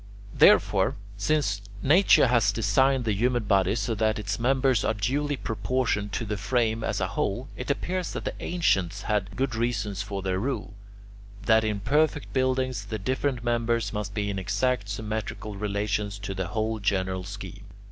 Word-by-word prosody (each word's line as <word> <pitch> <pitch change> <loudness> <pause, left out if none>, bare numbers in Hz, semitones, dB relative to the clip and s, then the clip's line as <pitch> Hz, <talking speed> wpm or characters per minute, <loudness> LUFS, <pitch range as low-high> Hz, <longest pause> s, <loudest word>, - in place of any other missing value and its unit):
Therefore, - - +5 0.2
since 140 -11 0 0.2
nature 175 +5 +6
has 115 -5 +3
designed 130 +4 +2
the 110 - +1
human 120 +3 +1
body 100 -1 +2
so 115 0 -1
that 110 0 +1
its 105 0 -3
members 130 -1 +2
are - - +1
duly 140 +7 -1
proportioned 105 -1 -1
to 115 - -2
the 105 0 -3
frame 110 +1 0
as - - -1
a - - -1
whole, 120 +6 -2
it 125 - -6
appears 180 +5 -2
that - - -5
the - - -2
ancients 100 - 0
had 105 -2 -1
good 130 -1 -1
reason 110 -3 -1
for 100 0 -4
their 95 -1 0
rule, 130 -2 -3 0.7
that 110 -1 +5
in 105 -2 -1
perfect 150 +5 +1
buildings 130 -4 0
the 110 +2 -4
different 130 +4 -1
members 115 -2 0
must 105 -1 -4
be 100 -1 -1
in 100 - -3
exact 100 +3 0
symmetrical 105 0 -4
relations 100 0 -2
to 95 -1 -5
the 95 -1 -3
whole 110 +3 -2
general 95 -2 0
scheme. 100 0 -8
110 Hz, 165 wpm, -26 LUFS, 100-125 Hz, 0.7 s, nature